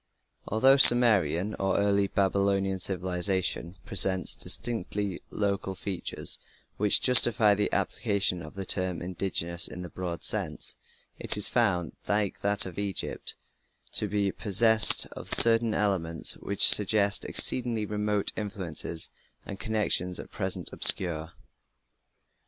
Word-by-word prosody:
Although 130 +6 +2
Sumerian 105 - +4
(early 100 +1 -1
Babylonian) 100 0 -2
civilization 90 -1 -4
presents 95 -1 +2
distinctively 105 -4 -2
local 100 -2 -4
features 95 -2 -1 0.4
which 105 0 +2
justify 120 -4 +4
the 105 +1 -3
application 95 -3 -2
of 75 +1 -13
the 95 0 -7
term 90 -2 -2
"indigenous" 85 -1 -3
in 90 - -10
the 90 - -10
broad 90 -2 -7
sense, - - -2 0.4
it - - +4
is 105 - +4
found, 95 - -2
like 100 -1 -3
that 100 +1 +1
of 95 0 -9
Egypt, 100 -1 -4 0.6
to 105 - 0
be 100 -1 -2
possessed 110 +2 +4
of - - -8
certain 115 -1 +7
elements 85 -6 -3
which 100 - +1
suggest 100 0 +3
exceedingly 115 -4 +3
remote 105 -1 -3
influences 95 -6 -4 0.3
and 95 - -10
connections 105 -5 -2
at - - -12
present - - -4
obscure. 85 -3 +1
100 Hz, 115 wpm, -26 LUFS, 90-105 Hz, 0.6 s, certain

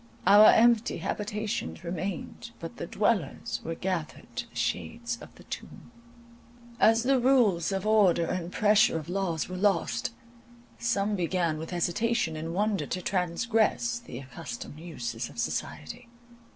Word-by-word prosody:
Our 205 +2 +9
empty 235 -1 +5
habitations 210 - -3
remained, 180 +1 -5
but - - -8
the - - -5
dwellers - - -1
were 165 - -4
gathered 175 -3 -4
to - - -4
the - - -24
shades 235 0 -2
of - - -12
the - - -15
tomb. - - -9 0.9
As 225 0 +5
the 265 +1 +3
rules 235 -10 +3
of 195 +1 -2
order 200 -6 +4
and 175 0 -3
pressure 210 -5 +4
of 160 +1 -7
laws 180 -4 -1
were 185 - -6
lost, 170 - +1 0.7
some 210 -3 0
began 170 -3 0
with 160 - -6
hesitation 175 +1 0
and 160 +1 -4
wonder 200 -6 0
to 185 - -2
transgress 220 +6 +1
the 235 - -9
accustomed 130 +2 -8
uses 120 -8 -5
of - - -15
society. 115 - -4
185 Hz, 140 wpm, -28 LUFS, 165-215 Hz, 0.9 s, Our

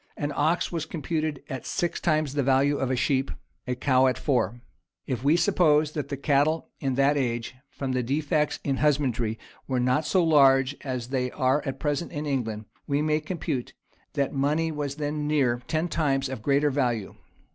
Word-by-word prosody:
An 145 0 -2
ox 160 +4 +1
was 165 -2 -3
computed 155 -2 -3
at 130 -5 -6
six 175 -2 -1
times 155 -4 +1
the 145 - +1
value 135 +2 +3
of 135 - -1
a 130 - +1
sheep; 130 +2 +1 0.4
a 125 - -1
cow 130 0 +3
at 130 - +1
four.[] 120 -4 0 0.5
If 130 -3 -3
we 145 +3 +4
suppose 155 -3 +3
that 150 -2 -4
the 140 - -3
cattle 145 +3 +1
in 135 -3 -1
that 140 +2 +3
age, 120 -4 -2 0.2
from 135 -2 -4
the 130 0 +1
defects 150 +4 0
in 135 -1 0
husbandry, 130 -7 +1 0.3
were 130 -2 0
not 130 +5 +1
so 185 -2 +3
large 135 -3 +5
as 125 -3 -4
they 130 -1 -1
are 130 +3 +1
at 135 - -4
present 150 +2 -1
in 150 -1 -4
England, 115 -7 -2 0.2
we 145 +1 +1
may 155 0 +2
compute 155 -5 -4 0.4
that 140 -1 -1
money 150 +4 +1
was 145 -2 -3
then 150 0 -2
near 130 -5 +1
ten 160 +2 0
times 135 -5 0
of 130 -4 -5
greater 140 +4 +2
value. 120 -7 -1
140 Hz, 185 wpm, -26 LUFS, 130-150 Hz, 0.5 s, large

